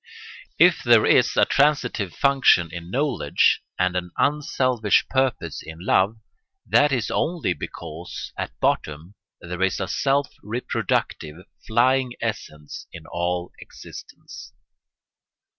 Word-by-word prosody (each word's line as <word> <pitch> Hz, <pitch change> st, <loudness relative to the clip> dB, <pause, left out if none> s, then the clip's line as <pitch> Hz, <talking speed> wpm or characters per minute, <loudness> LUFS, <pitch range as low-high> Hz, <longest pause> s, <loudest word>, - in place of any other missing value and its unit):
If -, -, +5 dB
there -, -, +5 dB
is -, -, +3 dB
a -, -, +5 dB
transitive 130 Hz, -, +1 dB
function 135 Hz, -, +3 dB
in 85 Hz, 0 st, -8 dB
knowledge 130 Hz, -, +1 dB, 0.2 s
and 90 Hz, 0 st, 0 dB
an 90 Hz, -1 st, -2 dB
unselfish 130 Hz, -5 st, +1 dB
purpose 130 Hz, -, -1 dB
in 80 Hz, 0 st, -10 dB
love, 95 Hz, +4 st, +1 dB, 0.5 s
that 145 Hz, 0 st, +3 dB
is 120 Hz, -5 st, -1 dB
only 165 Hz, -, -1 dB
because, 85 Hz, +1 st, -8 dB
at -, -, -6 dB
bottom, 75 Hz, +5 st, -1 dB, 0.3 s
there 90 Hz, +1 st, -6 dB
is 95 Hz, 0 st, +1 dB
a 95 Hz, -, -2 dB
self 140 Hz, +1 st, 0 dB
reproductive, 90 Hz, -7 st, -3 dB, 0.2 s
flying 125 Hz, +2 st, +2 dB
essence 75 Hz, -1 st, -6 dB
in 80 Hz, -2 st, -11 dB
all 85 Hz, +1 st, -3 dB
existence. -, -, -12 dB
100 Hz, 115 wpm, -23 LUFS, 85-130 Hz, 0.5 s, If